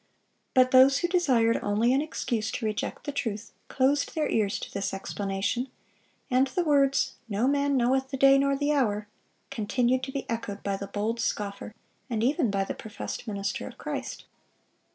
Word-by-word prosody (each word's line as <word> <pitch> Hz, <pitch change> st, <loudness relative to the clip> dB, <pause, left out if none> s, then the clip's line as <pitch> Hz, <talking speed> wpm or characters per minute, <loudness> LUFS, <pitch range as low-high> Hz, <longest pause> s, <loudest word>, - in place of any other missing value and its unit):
But 255 Hz, 0 st, +5 dB
those 265 Hz, +1 st, +7 dB
who 345 Hz, -, 0 dB
desired 260 Hz, -11 st, +2 dB
only 215 Hz, +4 st, +2 dB
an 275 Hz, -, +3 dB
excuse 235 Hz, -7 st, -2 dB
to 230 Hz, -, -3 dB
reject 215 Hz, -1 st, -3 dB
the 290 Hz, -, -3 dB
truth 225 Hz, -6 st, -4 dB, 0.2 s
closed 275 Hz, +2 st, +1 dB
their 310 Hz, -2 st, +1 dB
ears 205 Hz, -3 st, +1 dB
to -, -, -7 dB
this 195 Hz, -1 st, -2 dB
explanation; 195 Hz, +5 st, -2 dB, 0.6 s
and 255 Hz, +2 st, +4 dB
the 350 Hz, +7 st, -1 dB
words, 280 Hz, -3 st, +2 dB
"No 215 Hz, +4 st, +1 dB
man 280 Hz, 0 st, +2 dB
knoweth 265 Hz, +2 st, +1 dB
the 270 Hz, -, -4 dB
day 275 Hz, +1 st, +6 dB
nor 275 Hz, 0 st, +2 dB
the 290 Hz, +1 st, +1 dB
hour," 210 Hz, -7 st, 0 dB, 0.4 s
continued 250 Hz, +2 st, +1 dB
to 265 Hz, +1 st, -5 dB
be 275 Hz, -, -4 dB
echoed 215 Hz, -3 st, -4 dB
by 200 Hz, -1 st, -1 dB
the 200 Hz, 0 st, -6 dB
bold 210 Hz, +3 st, -2 dB
scoffer, 205 Hz, -1 st, -3 dB, 0.3 s
and 225 Hz, -2 st, -1 dB
even 275 Hz, 0 st, +2 dB
by 195 Hz, -1 st, 0 dB
the -, -, -4 dB
professed 220 Hz, +2 st, -7 dB
minister 200 Hz, -1 st, -3 dB
of -, -, -11 dB
Christ. -, -, -5 dB
245 Hz, 175 wpm, -27 LUFS, 210-275 Hz, 0.6 s, those